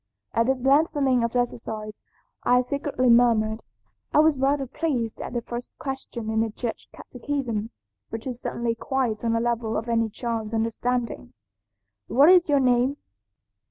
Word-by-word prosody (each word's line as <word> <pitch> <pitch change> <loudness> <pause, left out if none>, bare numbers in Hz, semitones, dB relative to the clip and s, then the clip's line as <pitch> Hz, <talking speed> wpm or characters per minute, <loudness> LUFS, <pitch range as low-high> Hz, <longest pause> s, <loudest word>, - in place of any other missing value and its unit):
"At 230 +1 +2
this 260 -2 0
lengthening 275 -3 +3
of 235 +1 -2
exercise 220 -3 -3 0.4
I 250 +1 +4
secretly 275 0 -1
murmured. 225 -2 +3 0.5
I - - +1
was 305 -2 +4
rather 275 +1 +2
pleased 255 -5 -2
at - - -6
the 240 -1 -2
first 240 +1 -7
question 265 -5 -5
in 220 - +1
the 225 - 0
Church 225 +2 -5
catechism, 245 -4 -4 0.4
which 225 0 -6
is 250 -2 -5
certainly 235 -1 -2
quite 240 -2 -2
on 230 -1 +1
the 230 - +2
level 230 -1 -1
of 225 - -4
any 230 -1 +1
child's 225 -1 -3
understanding, 230 - -2 0.7
'What 280 +6 +5
is 360 -3 +6
your 285 -1 +4
name?' 255 +2 +2
240 Hz, 155 wpm, -25 LUFS, 225-270 Hz, 0.7 s, is